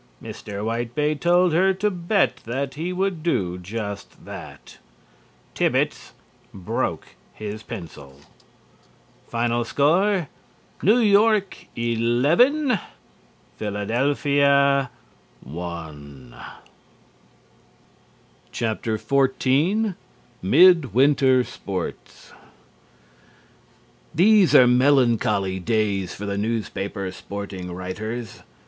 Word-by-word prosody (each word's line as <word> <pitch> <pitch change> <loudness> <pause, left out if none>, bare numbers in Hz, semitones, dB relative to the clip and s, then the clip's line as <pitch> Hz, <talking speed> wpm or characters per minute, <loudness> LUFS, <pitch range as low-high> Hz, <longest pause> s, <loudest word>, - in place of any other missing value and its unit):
Mr. 100 0 -7
Whitebait 120 +7 -2
told 175 0 +3
her 190 +3 +3
to 205 +2 0
bet 180 +2 0
that 135 +4 -4
he 165 +5 -4
would 185 -2 -2
do 90 - -1
just 100 +2 -7
that. - - -11 0.7
Thibbets - - -1 0.4
broke 95 -3 -3 0.3
his 105 0 -6
pencil. 75 - -10 1.4
Score: 170 - +1 0.5
New 215 +5 +4
York 210 -2 +2
11. 145 - +2 0.8
Philadelphia 140 +5 +1 0.5
1. 75 -5 -9 2.2
XIV 135 - 0 0.5
MID 165 - +5
WINTER 130 -1 +4
SPORTS 95 -5 -7 1.8
These 195 +2 +5
are 125 - +8
melancholy 120 -7 +2
days 100 -2 -1
for 105 - -7
the 100 0 -3
newspaper 100 -3 -3
sporting 100 -3 -7
writers. 105 +5 -6
125 Hz, 75 wpm, -23 LUFS, 100-165 Hz, 2.2 s, are